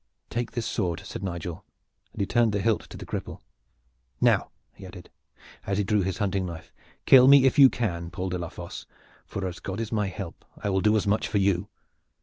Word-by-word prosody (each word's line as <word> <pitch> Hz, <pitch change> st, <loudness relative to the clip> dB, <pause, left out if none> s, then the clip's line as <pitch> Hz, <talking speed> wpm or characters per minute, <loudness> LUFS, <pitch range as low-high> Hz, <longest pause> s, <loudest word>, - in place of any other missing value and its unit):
"Take 120 Hz, 0 st, -3 dB
this 120 Hz, -2 st, -2 dB
sword!" 95 Hz, -6 st, -2 dB
said -, -, -7 dB
Nigel, 85 Hz, -3 st, -5 dB, 0.5 s
and -, -, -11 dB
he -, -, +2 dB
turned 115 Hz, +1 st, +2 dB
the 100 Hz, -, 0 dB
hilt 115 Hz, -2 st, 0 dB
to -, -, -9 dB
the -, -, -8 dB
cripple. -, -, -5 dB, 0.8 s
"Now!" -, -, +3 dB, 0.2 s
he -, -, -14 dB
added, -, -, -11 dB, 0.6 s
as 100 Hz, -, 0 dB
he 105 Hz, -, +1 dB
drew 105 Hz, +1 st, +1 dB
his 95 Hz, 0 st, -2 dB
hunting 95 Hz, -3 st, -1 dB
knife. 85 Hz, -2 st, -9 dB, 0.3 s
"Kill 130 Hz, -1 st, +8 dB
me 140 Hz, -1 st, +8 dB
if 135 Hz, +2 st, +3 dB
you 135 Hz, -2 st, +10 dB
can, 85 Hz, -9 st, -3 dB
Paul 95 Hz, +2 st, -4 dB
de 90 Hz, 0 st, -3 dB
la 85 Hz, -1 st, -4 dB
Fosse, -, -, -9 dB, 0.4 s
for 100 Hz, -, -4 dB
as 90 Hz, -2 st, -5 dB
God 95 Hz, +4 st, -5 dB
is 115 Hz, -1 st, -4 dB
my 105 Hz, -3 st, 0 dB
help 95 Hz, -2 st, -7 dB
I 100 Hz, -, -2 dB
will 95 Hz, 0 st, +1 dB
do 105 Hz, +2 st, +3 dB
as 105 Hz, -, 0 dB
much 105 Hz, +2 st, +1 dB
for 105 Hz, -, -1 dB
you!" 100 Hz, 0 st, +1 dB
100 Hz, 215 wpm, -26 LUFS, 90-110 Hz, 0.8 s, you